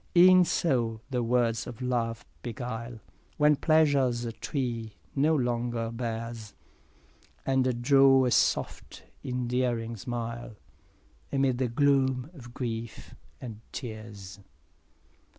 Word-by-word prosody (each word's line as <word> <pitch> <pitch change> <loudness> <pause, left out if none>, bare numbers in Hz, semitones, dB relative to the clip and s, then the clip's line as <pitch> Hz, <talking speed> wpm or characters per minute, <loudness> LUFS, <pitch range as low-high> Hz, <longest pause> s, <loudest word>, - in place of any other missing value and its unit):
6 - - +2
E'en 185 0 +8
so 120 -10 0
the 125 -2 0
words 115 -1 +1
of 120 - -8
love 120 -3 -2 0.2
beguile, 120 0 -5 0.4
When 150 0 +5
pleasure's 140 -6 +2 0.2
tree 120 -6 -3 0.2
no 150 +3 +3
longer 120 -3 -1
bears, 115 -2 -5 0.9
And 130 -2 +1
draw 135 0 +6
a 125 - +1
soft - - 0 0.2
endearing 125 -2 -1
smile, 115 +1 -5 0.8
Amid 135 -3 +1
the 130 - +1
gloom 130 +1 +2
of 120 -7 -12
grief 115 -2 -5 0.3
and 110 -4 -8
tears. 110 -5 -8
120 Hz, 105 wpm, -28 LUFS, 115-135 Hz, 0.9 s, E'en